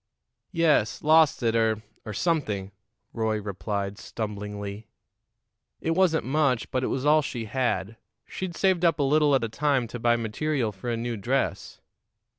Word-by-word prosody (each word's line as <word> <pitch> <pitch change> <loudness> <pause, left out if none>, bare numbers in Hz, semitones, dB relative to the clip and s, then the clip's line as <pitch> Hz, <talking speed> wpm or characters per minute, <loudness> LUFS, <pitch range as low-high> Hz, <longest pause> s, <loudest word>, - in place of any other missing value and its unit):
"Yes; 160 - +2
lost 155 -3 +4
it, 115 -1 +2
or 110 -1 +1 0.2
or - - -3
something," 105 - -1 0.4
Roy 110 -2 0
replied 100 0 -4
stumblingly. 105 -1 -6 0.9
"It 165 - -1
wasn't 165 -2 +2
much, 135 -3 +1
but 130 0 0
it - - +1
was 135 +1 -2
all 155 +1 +5
she 120 -5 -4
had. 115 -3 -1 0.3
She'd 185 -2 -5
saved 185 -3 +2
up 165 -3 +4
a 145 - +1
little 145 0 +4
at 130 - +1
a - - 0
time 135 0 +1
to 120 - -6
buy 120 +1 +3
material 120 +2 -1
for 100 +5 -7
a 115 - -1
new 115 0 -3
dress." 125 +7 -2
120 Hz, 160 wpm, -26 LUFS, 110-150 Hz, 0.9 s, all